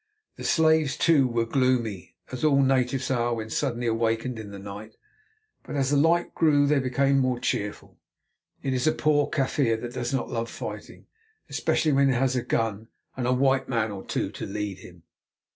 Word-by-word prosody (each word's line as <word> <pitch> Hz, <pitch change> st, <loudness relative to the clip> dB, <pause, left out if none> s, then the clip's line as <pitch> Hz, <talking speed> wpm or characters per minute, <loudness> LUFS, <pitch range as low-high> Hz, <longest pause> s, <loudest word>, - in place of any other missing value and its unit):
The -, -, -9 dB
slaves, 160 Hz, -3 st, +3 dB
too, 150 Hz, -6 st, +4 dB
were 115 Hz, -1 st, 0 dB
gloomy, 120 Hz, -6 st, 0 dB, 0.2 s
as 130 Hz, +2 st, -6 dB
all 140 Hz, -3 st, +4 dB
natives 130 Hz, 0 st, +1 dB
are 120 Hz, -2 st, +1 dB
when 110 Hz, -1 st, -6 dB
suddenly 120 Hz, -3 st, -1 dB
awakened 115 Hz, +1 st, -1 dB
in 105 Hz, -2 st, -8 dB
the 100 Hz, -, -9 dB
night; 100 Hz, +2 st, -9 dB, 0.6 s
but -, -, -8 dB
as 135 Hz, -1 st, 0 dB
the -, -, +3 dB
light 165 Hz, +4 st, +2 dB
grew 145 Hz, -3 st, +3 dB
they 145 Hz, 0 st, +3 dB
became 135 Hz, +1 st, +2 dB
more 130 Hz, -2 st, 0 dB
cheerful. 105 Hz, -3 st, -3 dB, 0.6 s
It 135 Hz, -, -1 dB
is 130 Hz, +3 st, 0 dB
a 155 Hz, -, +4 dB
poor 150 Hz, -1 st, +2 dB
Kaffir 130 Hz, -5 st, 0 dB
that 120 Hz, +1 st, -6 dB
does 120 Hz, -1 st, -3 dB
not 135 Hz, -3 st, -1 dB
love 115 Hz, 0 st, -2 dB
fighting, -, -, -8 dB, 0.5 s
especially 155 Hz, -, +1 dB
when 140 Hz, 0 st, +4 dB
he 135 Hz, -, +2 dB
has 130 Hz, +1 st, +1 dB
a 125 Hz, -, +1 dB
gun 115 Hz, -2 st, -2 dB, 0.3 s
and 125 Hz, -1 st, -2 dB
a -, -, +2 dB
white 135 Hz, +1 st, +2 dB
man 115 Hz, -4 st, 0 dB
or 100 Hz, -1 st, -7 dB
two -, -, -2 dB
to -, -, -6 dB
lead 100 Hz, -1 st, -4 dB
him. 90 Hz, -2 st, -14 dB
125 Hz, 190 wpm, -26 LUFS, 115-140 Hz, 0.6 s, too